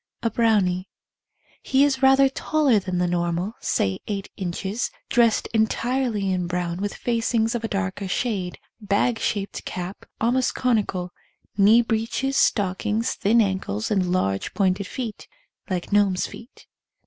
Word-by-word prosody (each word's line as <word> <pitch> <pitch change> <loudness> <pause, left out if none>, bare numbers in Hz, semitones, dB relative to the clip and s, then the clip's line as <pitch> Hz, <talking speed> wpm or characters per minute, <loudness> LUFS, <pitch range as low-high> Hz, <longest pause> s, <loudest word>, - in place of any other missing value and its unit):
A 230 - +1
Brownie. 200 -5 +2 0.7
He 270 +1 +3
is 285 -2 +1
rather 270 0 +6
taller 270 -3 +2
than 185 -2 -3
the 180 - +2
normal, 175 +3 -1
say 95 -1 0
eight 200 -2 -4
inches, 190 +4 -3 0.2
dressed 235 -3 +3
entirely 225 -2 0
in 180 -1 -1
brown 175 0 -2
with 205 0 -2
facings 230 -1 0
of 240 -1 -3
a - - 0
darker 195 -1 -3
shade, 195 -3 -2 0.2
bag 215 +3 +1
shaped 200 -2 -2
cap, 180 +2 -6
almost 245 +3 +1
conical, 200 -7 0 0.4
knee 215 +4 +6
breeches, 230 +4 -1
stockings, 210 +2 +1
thin 230 +4 +3
ankles, 190 - -2
and 185 -4 +1
large 95 - -1
pointed 190 -1 +1
feet 230 -3 -6 0.2
— - - -31
like 180 0 -3
gnomes' 200 -3 +3
feet. 235 - -12
205 Hz, 140 wpm, -24 LUFS, 185-235 Hz, 0.7 s, rather